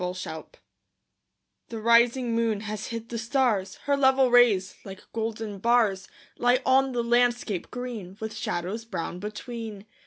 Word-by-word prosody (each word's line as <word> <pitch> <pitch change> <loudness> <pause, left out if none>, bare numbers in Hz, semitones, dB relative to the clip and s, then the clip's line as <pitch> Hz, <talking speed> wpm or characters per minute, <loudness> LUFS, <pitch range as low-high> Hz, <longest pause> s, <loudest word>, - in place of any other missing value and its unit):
ENDYMION 180 -3 -5 1.2
The 230 - -5
rising 235 +2 +3
moon 225 -3 0
has 215 0 -5
hid 230 0 -6
the 230 - -4
stars; 235 -5 0
Her 285 -1 +2
level 265 -2 +4
rays, 220 -6 +4
like 195 -1 -10
golden 220 -2 -4
bars, 215 -4 +2 0.3
Lie 245 +1 +4
on 265 0 +3
the 240 -1 0
landscape 240 -4 +1
green, 230 -7 -6
With 220 0 -5
shadows 205 +1 -3
brown 180 -5 -5
between. 215 0 -7
230 Hz, 135 wpm, -26 LUFS, 205-245 Hz, 1.2 s, level